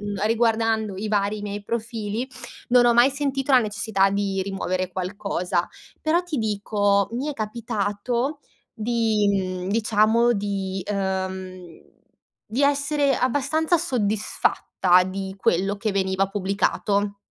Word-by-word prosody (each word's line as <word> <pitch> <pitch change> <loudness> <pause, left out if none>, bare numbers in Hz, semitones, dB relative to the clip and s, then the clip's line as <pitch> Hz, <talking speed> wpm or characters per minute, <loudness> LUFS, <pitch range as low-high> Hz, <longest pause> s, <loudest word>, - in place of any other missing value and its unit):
mhmm, 205 -1 -3
riguardando 225 -2 +1
i 210 +3 -4
vari 205 0 0
miei 205 0 -5
profili 225 +1 -3 0.4
non 245 0 +5
ho 240 - +4
mai 240 +3 +6
sentito 275 0 -1
la 260 - +8
necessità 205 -2 +1
di 200 -1 -1
rimuovere 185 -1 -2
qualcosa. 180 -1 -2 0.3
Però 325 +3 +2
ti 345 -5 -4
dico, 205 -2 +1
mi 255 +5 -2
è - - -1
capitato 230 +4 -2 0.4
d 220 +1 -5 0.4
mhmm, 185 -2 -1
diciamo 220 +2 +3
di 195 -3 -3
uhm, 190 -3 -4 0.5
di 240 +6 -1
essere 280 0 +2
abbastanza 285 +6 +1
soddisfatta 210 - +1
di 190 +1 -5
quello 195 +1 +1
che 215 +2 -2
veniva 190 0 0
pubblicato. 200 +1 0
205 Hz, 120 wpm, -24 LUFS, 195-235 Hz, 0.5 s, la